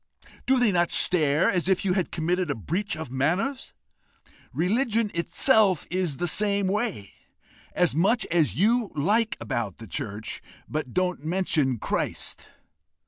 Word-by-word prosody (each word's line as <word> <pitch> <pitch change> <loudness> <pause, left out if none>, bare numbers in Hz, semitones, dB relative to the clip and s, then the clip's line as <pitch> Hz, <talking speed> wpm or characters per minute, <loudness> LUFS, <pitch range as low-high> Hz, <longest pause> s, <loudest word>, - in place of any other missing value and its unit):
Do 265 - +4
they 245 -4 +3
not 175 -2 +1
stare 155 -3 +3
as 180 -1 0
if 190 +1 +1
you 185 - +2
had 185 -2 -1
committed 175 +1 -1
a 145 - -1
breach 170 - -2
of 160 -6 -7
manners? 180 - -1 0.8
Religion 220 - 0
itself 195 - +3
is 180 -6 -1
the 175 - -1
same 200 +3 +2
way: 195 - -2 0.6
as 180 -5 +2
much 200 - +2
as 165 -3 +2
you 225 +4 +2
like 215 +10 +1
about 110 -4 -4
the 115 - -10
church, 105 +1 -5 0.3
but 150 -4 -4
don't 180 -5 -1
mention 155 -6 0
Christ! - - -3
180 Hz, 140 wpm, -25 LUFS, 150-205 Hz, 0.8 s, Do